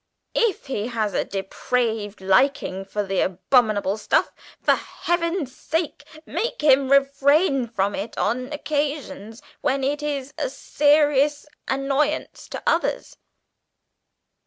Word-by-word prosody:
If 460 Hz, -5 st, +1 dB
he 235 Hz, -6 st, -3 dB
has 220 Hz, -4 st, -2 dB
a -, -, +1 dB
depraved 210 Hz, +2 st, -2 dB
liking 195 Hz, -1 st, +2 dB
for 205 Hz, +2 st, -2 dB
the 195 Hz, 0 st, -1 dB
abominable 205 Hz, +1 st, +2 dB
stuff, -, -, +1 dB, 0.3 s
for -, -, +4 dB
Heaven's 335 Hz, -5 st, -2 dB
sake 320 Hz, -2 st, -3 dB, 0.2 s
make 470 Hz, -, -3 dB
him 270 Hz, -2 st, +5 dB
refrain 275 Hz, 0 st, +3 dB
from 200 Hz, -3 st, -1 dB
it 210 Hz, +3 st, -5 dB
on 255 Hz, +3 st, -1 dB
occasions 285 Hz, -7 st, -3 dB, 0.2 s
when 270 Hz, +1 st, 0 dB
it 290 Hz, +2 st, 0 dB
is 285 Hz, -2 st, -3 dB
a -, -, -1 dB
serious 295 Hz, -, +2 dB, 0.2 s
annoyance 275 Hz, +3 st, -1 dB
to -, -, -6 dB
others!" -, -, 0 dB
270 Hz, 115 wpm, -23 LUFS, 215-295 Hz, 0.3 s, him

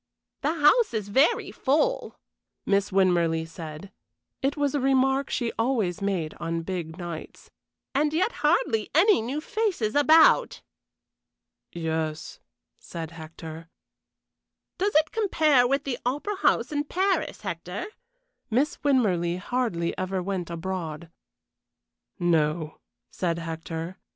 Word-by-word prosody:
"The 305 Hz, +3 st, 0 dB
house 325 Hz, -, +4 dB
is 205 Hz, -2 st, -3 dB
very 270 Hz, +10 st, +3 dB
full," 320 Hz, -, 0 dB, 0.5 s
Miss 200 Hz, 0 st, +2 dB
Winmarleigh 170 Hz, -4 st, +2 dB
said 165 Hz, +3 st, -9 dB, 0.5 s
it 275 Hz, +3 st, 0 dB
was 285 Hz, -1 st, +1 dB
a 290 Hz, -, +1 dB
remark 270 Hz, +1 st, +2 dB
she 235 Hz, -2 st, -1 dB
always 225 Hz, -7 st, 0 dB
made 185 Hz, -6 st, -1 dB
on 165 Hz, 0 st, -2 dB
big 170 Hz, -2 st, -5 dB
nights 175 Hz, -3 st, -8 dB, 0.4 s
"and 295 Hz, +2 st, +2 dB
yet 365 Hz, +9 st, +1 dB
hardly 225 Hz, -, +2 dB
any 385 Hz, -, +5 dB
new 255 Hz, +7 st, -3 dB
faces 345 Hz, -, -1 dB
about." 310 Hz, +2 st, +5 dB, 1.1 s
"Yes," 160 Hz, -2 st, -3 dB, 0.4 s
said 165 Hz, -1 st, -7 dB
Hector. 160 Hz, 0 st, -9 dB, 1.1 s
"Does 400 Hz, 0 st, 0 dB
it 310 Hz, +1 st, +4 dB
compare 310 Hz, -, +3 dB
with 275 Hz, +2 st, +1 dB
the 255 Hz, -3 st, -3 dB
Opera 295 Hz, +11 st, -2 dB
House 235 Hz, -9 st, +2 dB
in 290 Hz, 0 st, -1 dB
Paris, 375 Hz, +2 st, 0 dB
Hector?" 180 Hz, -1 st, -5 dB, 0.6 s
Miss 265 Hz, +7 st, +1 dB
Winmarleigh 185 Hz, -11 st, +2 dB
hardly 185 Hz, -5 st, -1 dB
ever 185 Hz, 0 st, -2 dB
went 185 Hz, -2 st, -3 dB
abroad. 170 Hz, -2 st, -5 dB, 1.1 s
"No," 160 Hz, -3 st, 0 dB, 0.3 s
said 170 Hz, -2 st, -1 dB
Hector. 165 Hz, +2 st, -5 dB
200 Hz, 115 wpm, -26 LUFS, -, 1.1 s, any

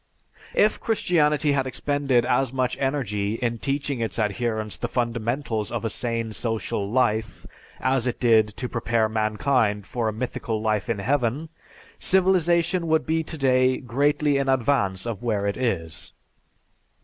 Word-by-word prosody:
If 215 Hz, -, +3 dB
Christianity 150 Hz, -9 st, +2 dB
had 135 Hz, -2 st, +1 dB
expended 135 Hz, -2 st, +1 dB
as 130 Hz, 0 st, +1 dB
much 130 Hz, -1 st, -1 dB
energy 110 Hz, -7 st, -1 dB
in 115 Hz, -1 st, -2 dB
teaching 140 Hz, 0 st, -2 dB
its 115 Hz, -4 st, -2 dB
adherents 110 Hz, 0 st, -1 dB
the -, -, -3 dB
fundamentals 120 Hz, -1 st, -2 dB
of 115 Hz, -2 st, -3 dB
a 115 Hz, -, -1 dB
sane 115 Hz, -1 st, -2 dB
social 110 Hz, -2 st, -2 dB
life, 110 Hz, -2 st, 0 dB, 0.3 s
as 130 Hz, -1 st, +1 dB
it 120 Hz, -, -2 dB
did 110 Hz, -3 st, +4 dB
to 125 Hz, -, -3 dB
prepare 115 Hz, -2 st, 0 dB
mankind 110 Hz, -1 st, 0 dB
for 120 Hz, 0 st, -2 dB
a -, -, +1 dB
mythical 115 Hz, 0 st, -3 dB
life 110 Hz, 0 st, -1 dB
in 115 Hz, -, 0 dB
Heaven, 135 Hz, +6 st, -1 dB, 0.5 s
civilization 180 Hz, -2 st, +2 dB
would 160 Hz, 0 st, +2 dB
be 160 Hz, +1 st, +1 dB
today 130 Hz, -5 st, +2 dB
greatly 145 Hz, +3 st, +1 dB
in 135 Hz, -1 st, 0 dB
advance 120 Hz, -7 st, +1 dB
of 115 Hz, -3 st, -4 dB
where 110 Hz, -4 st, -1 dB
it 100 Hz, -, 0 dB
is. 85 Hz, -11 st, -3 dB
120 Hz, 145 wpm, -24 LUFS, 110-140 Hz, 0.5 s, did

